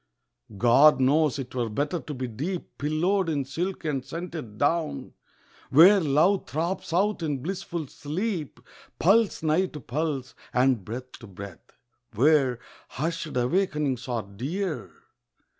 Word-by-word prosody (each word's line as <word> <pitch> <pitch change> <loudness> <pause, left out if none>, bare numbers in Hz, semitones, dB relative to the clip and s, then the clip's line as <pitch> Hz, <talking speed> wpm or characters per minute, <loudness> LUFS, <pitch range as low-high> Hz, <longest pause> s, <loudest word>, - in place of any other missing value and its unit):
God 130 +8 +6
knows 145 +2 +3
'twere 125 -4 -3
better 145 +10 -1
to 150 - -7
be 130 0 -3
deep 155 - -5
Pillowed 170 +5 +1
in 145 -4 -1
silk 175 +7 -4
and 140 -4 -1
scented 155 -6 -7
down, 155 +5 -1 0.6
Where 180 +8 +8
Love 165 +5 +2
throbs 170 +5 -2
out 195 +3 +1
in 145 -5 -2
blissful 175 -3 -4
sleep, 160 - -4 0.4
Pulse 200 +1 +3
nigh 160 +4 +2
to 150 - -9
pulse, 135 0 -3 0.2
and 125 -4 +3
breath 125 +5 -7
to 115 - -11
breath, 95 -2 -11 0.4
Where 135 0 +4 0.4
hushed 160 0 -3
awakenings 140 -2 0
are 120 -3 -2
dear 130 - -4
150 Hz, 125 wpm, -26 LUFS, 130-170 Hz, 0.6 s, Where